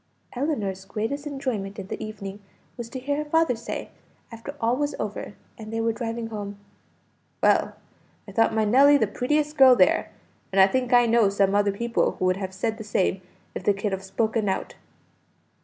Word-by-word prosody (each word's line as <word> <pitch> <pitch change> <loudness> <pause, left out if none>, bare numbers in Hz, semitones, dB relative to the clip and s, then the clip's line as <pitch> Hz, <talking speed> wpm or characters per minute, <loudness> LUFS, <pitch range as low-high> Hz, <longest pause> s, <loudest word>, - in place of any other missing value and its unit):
Ellinor's 215 -9 -2
greatest 225 +9 -4
enjoyment 255 -9 -4
in 195 - -6
the - - -6
evening 200 -2 -7 0.4
was 240 -2 -7
to 260 - -6
hear 285 +3 -2
her 300 0 -4
father 325 -5 +3
say, 230 +1 -6 0.4
after 230 +5 -8
all 230 +2 +2
was 290 +2 -1
over, 210 -1 -5 0.2
and 215 0 -8
they 225 - -2
were 225 0 +1
driving 230 0 -4
home 205 -2 -6 0.9
"Well, - - +3 0.5
I - - -9
thought 225 -1 +3
my 220 -1 +1
Nelly 275 +6 +6
the 220 - +2
prettiest 295 +8 -1
girl 260 -2 +8
there, 315 +6 +3 0.4
and 195 - +1
I 190 - +9
think 250 +5 -1
I 245 -1 +6
know 230 -3 +4
some 195 0 +2
other 205 0 +3
people 235 +4 0
who 185 - -3
would 185 0 +2
have 190 -1 -4
said 220 +4 -3
the - - -5
same 195 -2 0 0.3
if - - -6
they 205 - +3
could 195 +1 -2
have 190 0 -3
spoken 220 +2 -1
out." 190 - -3
225 Hz, 190 wpm, -25 LUFS, 200-255 Hz, 0.9 s, I